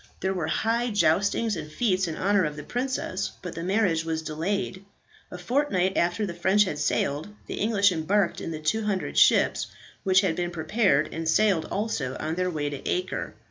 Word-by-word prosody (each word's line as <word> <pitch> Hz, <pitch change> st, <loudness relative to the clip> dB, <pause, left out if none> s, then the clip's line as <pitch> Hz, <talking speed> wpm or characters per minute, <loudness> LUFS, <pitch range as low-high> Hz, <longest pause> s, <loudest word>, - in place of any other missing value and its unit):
There 190 Hz, 0 st, -1 dB
were 175 Hz, -4 st, -2 dB
high 235 Hz, +5 st, 0 dB
joustings 205 Hz, +2 st, +2 dB
and 155 Hz, -2 st, -7 dB
fetes 190 Hz, -2 st, +1 dB
in 160 Hz, -, -4 dB
honour 200 Hz, 0 st, +2 dB
of 150 Hz, -2 st, -2 dB
the 150 Hz, -, -7 dB
princess, 245 Hz, -, -3 dB
but 180 Hz, -, -5 dB
the 165 Hz, -, -6 dB
marriage 185 Hz, -3 st, +1 dB
was 160 Hz, -1 st, -3 dB
delayed. 185 Hz, +5 st, -3 dB, 0.5 s
A 180 Hz, -, -8 dB
fortnight 190 Hz, -3 st, 0 dB
after 175 Hz, +5 st, +1 dB
the 180 Hz, -, -4 dB
French 190 Hz, +4 st, +3 dB
had 150 Hz, -7 st, -4 dB
sailed, 145 Hz, +1 st, 0 dB, 0.2 s
the -, -, -5 dB
English 205 Hz, -2 st, +3 dB
embarked 180 Hz, +3 st, 0 dB
in -, -, -4 dB
the 160 Hz, -2 st, -5 dB
200 205 Hz, +4 st, -1 dB
ships, -, -, +4 dB, 0.4 s
which 185 Hz, -1 st, +4 dB
had 185 Hz, -5 st, 0 dB
been 175 Hz, 0 st, -2 dB
prepared, 165 Hz, -2 st, +1 dB
and 165 Hz, 0 st, -2 dB
sailed 195 Hz, -2 st, +3 dB
also 155 Hz, -, -2 dB
on 155 Hz, +1 st, -2 dB
their 180 Hz, +1 st, 0 dB
way 150 Hz, -4 st, -2 dB
to 140 Hz, -1 st, -7 dB
Acre. 180 Hz, +1 st, -2 dB
185 Hz, 185 wpm, -26 LUFS, 160-205 Hz, 0.5 s, ships